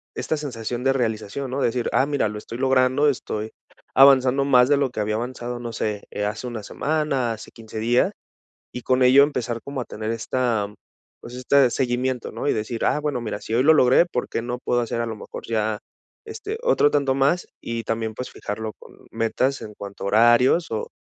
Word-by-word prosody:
esta 155 - -1
sensación 120 -4 -5
de 135 - +3
realización, 120 +1 -2
¿no? 135 +1 -2
Decir: 120 0 0
"Ah 130 - +4
mira 145 -5 0
lo 105 - -6
estoy 115 +2 -8
logrando, 130 +2 +3
estoy 110 -4 -3 0.4
avanzando 135 0 +6
más 125 -3 +5
de 145 - +5
lo 140 -1 +1
que 110 - -6
había 105 0 0
avanzado, 120 +1 -4
no 120 -1 -5
sé, 105 -2 -3
eh, 105 - -2
hace 110 +4 -4
1 115 -3 -6
semana, 140 -3 -1
hace 110 - -10
15 110 -1 -9
días", 120 +3 +2 0.6
y 125 - -7
con 130 0 +1
ello 130 +3 +7
empezar 125 -5 -2
como 140 -2 -4
a 120 - -5
tener 110 +1 -5
esta 115 -2 -1 0.5
pues, 120 - -10
este 130 +1 +3
seguimiento, 125 -1 -1
¿no? 115 +6 -4
Y - - +3
decir: 110 +2 -3
"Ah 150 - +2
bueno 145 -5 -2
mira, 105 -2 -4
si 110 - -6
hoy 125 - +3
lo 160 +3 +7
logré, 130 +3 +5
¿por 125 -8 -3
qué - - -2
no 120 +1 -4
puedo 120 -1 0
hacer 115 0 -2
a - - -1
lo 110 - -4
mejor 105 - -9
ya, 110 -1 -1 0.5
este, 440 -1 -6
otro - - +3
tanto 140 -2 +2
más?", 140 +6 +1
y 115 0 -4
también, 110 0 -2
pues 125 - -5
fijarlo 110 +1 -5
con - - -16
metas 130 +4 0
en 105 - -8
cuanto 100 -1 -9
a - - -1
horarios 120 - +4
o 110 - -3
125 Hz, 210 wpm, -23 LUFS, 110-135 Hz, 0.6 s, ello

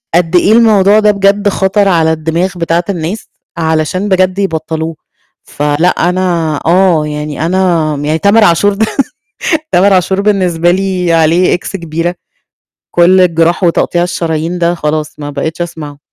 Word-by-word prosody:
قد 175 0 +1
إيه 200 +4 +4
الموضوع 215 -3 +4
ده 210 -1 +3
بجد 200 +1 +1
خَطر 195 +1 +1
على 165 -3 +2
الدماغ 165 +4 -1
بتاعة 170 +1 0
الناس 175 +3 -4 0.3
علشان 160 +5 -1
بجد 185 +1 +1
يبطّلوه. 160 -3 -3 0.5
فلأ 145 +4 -1 0.2
أنا 170 -5 -1
آه، 170 -3 +2
يعني 150 +1 -4
أنا 170 -4 0
م 145 +1 -5
يعني 155 +2 0
تامر 210 +2 +3
عاشور 205 +2 +3
ده، 220 +2 0 0.9
تامر 195 +2 +3
عاشور 190 +2 +1
بالنسبة 180 -5 +1
لي 185 -2 -1
عليه 165 +3 +2
إكس 180 - -4
كبيرة، 170 0 -3 0.8
كل 180 +2 +4
الجراح 170 +1 +1
وتقطيع 175 0 +1
الشرايين 165 0 -3
ده 170 +1 +1
خلاص 150 -1 -3
ما 145 0 -6
بقيتش 160 +4 -4
أسمعه. 150 -4 -6
175 Hz, 145 wpm, -11 LUFS, 160-190 Hz, 0.9 s, إيه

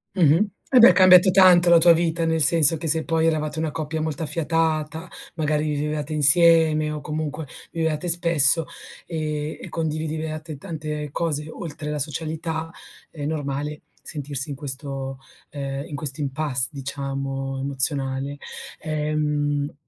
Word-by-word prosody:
Mh-mh. 175 +4 +4 0.2
Eh 255 - +6
beh, 235 - +10
è - - +5
cambiata 185 0 +7
tanto 180 -2 +6
la 170 - +8
tua 170 +1 +7
vita, 165 0 0
nel 160 0 0
senso 160 +1 +4
che 160 +1 -5
se 160 +1 +1
poi 165 -1 +1
eravate 155 -1 -1
una 160 -2 -1
coppia 155 0 -4
molto 155 -1 -3
affiatata, 160 +1 -1 0.3
magari 155 -1 0
vivevate 150 +1 -3
insieme 155 0 +4
o 150 - -4
comunque 155 +1 -4 0.3
vi 165 - -4
vedevate 160 +2 -1
spesso, 165 -2 +3 0.4
ehm, 155 -2 -4
e - - -8
condividevate 155 -1 -4
tante 150 -2 -5
cose 150 -2 -2
oltre 150 -2 -7
la 150 -1 -3
socialità, 160 +2 -3 0.4
è 150 - -9
normale 150 0 -3 0.2
sentirsi 145 -2 -5
in 140 - -4
questo 135 -1 -6 0.3
ehm, 140 -1 -5
in 150 - -7
questo 145 0 -3
impasse, 140 -2 0
diciamo, 135 -1 -4
emozionale. 135 0 -1 0.4
Ehm, 150 -1 -1
155 Hz, 140 wpm, -23 LUFS, 145-160 Hz, 0.4 s, beh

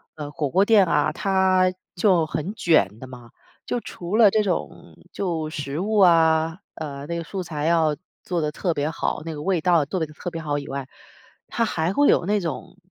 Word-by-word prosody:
呃， 150 -2 -6
火 145 -2 -2
锅 195 +8 +3
店 210 -4 +5
啊， 155 -2 +1
它 185 -1 +2 0.2
就 175 -3 +3
很 155 +6 -4
卷 110 - +2
的 130 - -9
嘛， 125 -2 -12 0.4
就 245 - -2
除 185 -1 -4
了 220 -4 +7
这 215 +1 +2
种 185 -4 -4 0.2
就 165 -5 -2
食 145 -1 -4
物 210 +2 0
啊。 165 -2 +4 0.2
呃， 140 -2 -6
那 170 0 -3
个 170 - -4
素 190 +2 -5
材 155 -3 -4
要 165 -2 +3 0.3
做 175 -2 -2
得 150 -1 -1
特 175 -3 -1
别 145 0 -1
好， 160 - -2
那 165 - -4
个 150 - -7
味 185 +2 +1
道 180 +2 +2
要 150 - +2
做 180 +5 -3
得 160 - 0
特 150 +4 -7
别 165 - -5
好 145 -2 -2
以 145 0 -6
外， 135 -1 -5 0.6
它 230 - 0
还 165 -4 -1
会 285 +4 +3
有 - - +3
那 205 +2 +1
种 165 0 -6
165 Hz, 230 characters per minute, -23 LUFS, 150-190 Hz, 0.6 s, 了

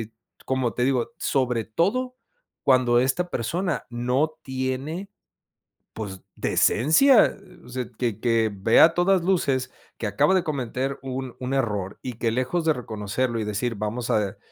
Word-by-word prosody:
eh, 110 - -10 0.4
como 130 -3 0
te 125 - 0
digo, 130 +1 0
sobre 125 -5 0
todo 230 - 0 0.5
cuando 125 -2 +4
esta 135 +8 0
persona 170 - -2
no 125 +6 0
tiene, 130 +8 -3 0.9
pues 95 -4 -6
decencia, 215 - +4 0.3
o - - -13
sea, 125 0 -4
que 115 -5 -1
que 115 -2 +2
ve 100 +3 +3
a 165 +1 +7
todas 180 0 +2
luces, 135 -9 +1 0.3
que 115 - -4
acaba 105 - +2
de 185 - +2
cometer 135 -1 -3
un 130 -1 -5
un 130 +1 -3
error 105 -7 -1
y 125 - -4
que 115 - +1
lejos 130 +8 -1
de 155 - +4
reconocerlo 115 +1 -3
y 110 - -2
decir 105 +3 -2
vamos 110 +4 -3
a 105 -3 0
130 Hz, 155 wpm, -24 LUFS, 115-155 Hz, 0.9 s, a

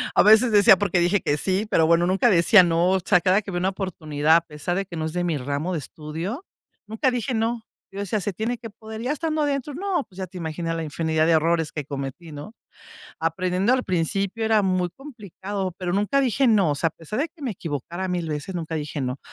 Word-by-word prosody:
A - - +6
veces 220 +3 +6
decía: 200 -2 +7
"¿Por 200 -2 -1
qué 180 - +3
dije 175 +3 +2
que 145 - 0
sí?". 190 +6 0
Pero 160 -1 +4
bueno, 170 +1 +4
nunca 195 +6 +3
decía 185 +2 +6
no, 170 +1 +2
o 190 - +2
sea, 180 0 +3
cada 190 +4 +3
que 200 - -10
había 175 -1 -2
una 185 +2 +1
oportunidad, 160 -5 0
a 170 - +5
pesar 160 +2 -4
de 195 +1 -1
que 175 -3 -8
no 155 - -2
es 160 - -4
de 180 0 -1
mi 165 -4 0
ramo 145 +6 -3
de 160 - -1
estudio, 165 - -6 0.4
nunca 220 +4 0
dije 245 0 -2
no. 225 +1 -1 0.3
Yo 200 - -6
decía: 205 +2 -1
"Se 195 +1 -3
tiene 230 +5 -2
que 230 -1 -9
poder". 220 +1 -9
Ya 260 +5 -1
estando 310 -1 -1
adentro, 285 0 -2
no, 365 -2 -1
pues, 185 - -19
ya 190 -1 -4
te 180 +1 -11
imaginas 165 0 -3
la 165 - -3
infinidad 160 +1 0
de 165 - +3
errores 165 0 +1
que 150 -3 -5
cometí, 140 +3 -6
¿no? 145 +10 -9 0.6
Aprendiendo, 180 +6 0
al 255 0 +2
principio 195 +5 -1
era 220 -1 +3
muy 185 -2 0
complicado, 200 - -6
pero 180 -2 -3
nunca 210 +8 +1
dije 265 0 +2
no, 200 -9 +4
o - - -1
sea, 165 - +1
a - - -23
pesar 170 - -6
de 320 - -1
que 325 -2 -22
me 255 -5 -2
equivocara 170 +2 -5
1000 175 -2 -2
veces, 150 +4 -4
nunca 165 -1 -4
dije 150 -1 -4
no. 125 +1 -3
185 Hz, 240 wpm, -23 LUFS, 165-220 Hz, 0.6 s, decía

